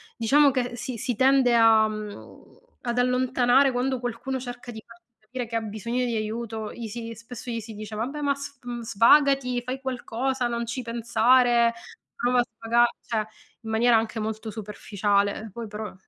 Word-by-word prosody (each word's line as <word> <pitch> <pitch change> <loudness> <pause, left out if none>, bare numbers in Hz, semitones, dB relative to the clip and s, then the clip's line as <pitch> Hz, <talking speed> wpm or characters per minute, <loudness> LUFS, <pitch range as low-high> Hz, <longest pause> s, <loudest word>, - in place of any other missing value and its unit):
diciamo 280 +5 +4
che 245 -2 -2
si 245 +2 -5
si 235 0 -3
tende 265 -2 +4
a 225 -1 +6
mhmm, 215 -1 -9 0.2
ad 240 0 -2
allontanare 255 +1 +3
quando 255 +1 0
qualcuno 245 +2 -4
cerca 245 -1 -8
di 220 -1 -9
farsi 230 0 -17 0.2
capire 245 +3 -6
che 230 0 -3
ha 225 - -1
bisogno 225 +4 -3
di 235 - -2
aiuto, 220 0 -4
gli 235 -2 -7
si 230 +1 -6
spesso 235 +2 -9
gli 230 - -2
si 220 0 -9
dice: 215 +1 -8
"Vabbè, 260 +8 -3
ma 285 -1 +2
sv 255 -4 -7
svagati, 250 +3 +4
fai 260 +2 -4
qualcosa, 255 0 -2
non 235 0 -2
ci 235 +3 -4
pensare, 235 0 +3 0.4
prova 245 +1 +1
a 245 - +4
svaga", 235 +2 +3 0.2
cioè 220 -2 -1 0.4
in 220 - -7
maniera 230 +1 +4
anche 225 0 -2
molto 220 0 -4
superficiale, 205 0 -1
poi 230 -2 -6
però 210 +1 -6
235 Hz, 170 wpm, -25 LUFS, 220-250 Hz, 0.4 s, a